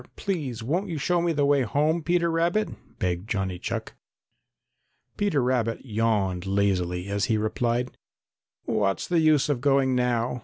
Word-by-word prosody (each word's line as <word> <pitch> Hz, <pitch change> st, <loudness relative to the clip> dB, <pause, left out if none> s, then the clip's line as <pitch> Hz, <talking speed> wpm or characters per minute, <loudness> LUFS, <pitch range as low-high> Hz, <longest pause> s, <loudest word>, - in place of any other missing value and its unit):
Please 140 Hz, -, -3 dB
won't 175 Hz, -, -1 dB
you 165 Hz, -, -3 dB
show 175 Hz, +4 st, +1 dB
me 170 Hz, 0 st, +1 dB
the 145 Hz, -3 st, +1 dB
way 140 Hz, -1 st, +3 dB
home, 150 Hz, +8 st, +1 dB
Peter 170 Hz, +1 st, +1 dB
Rabbit?" 170 Hz, +6 st, +1 dB, 0.3 s
begged 90 Hz, +3 st, -2 dB
Johnny 95 Hz, -3 st, -2 dB
Chuck. -, -, -4 dB, 1.2 s
Peter 200 Hz, -10 st, +1 dB
Rabbit 120 Hz, -1 st, 0 dB
yawned 105 Hz, -5 st, 0 dB
lazily 95 Hz, -2 st, 0 dB
as 100 Hz, 0 st, 0 dB
he 110 Hz, -, +1 dB
replied: 120 Hz, +3 st, -1 dB, 0.7 s
"What's 100 Hz, -2 st, 0 dB
the 175 Hz, -2 st, +2 dB
use 155 Hz, -3 st, +4 dB
of 140 Hz, -5 st, -1 dB
going 135 Hz, -1 st, +3 dB
now? 125 Hz, -1 st, 0 dB
125 Hz, 150 wpm, -26 LUFS, 105-155 Hz, 1.2 s, use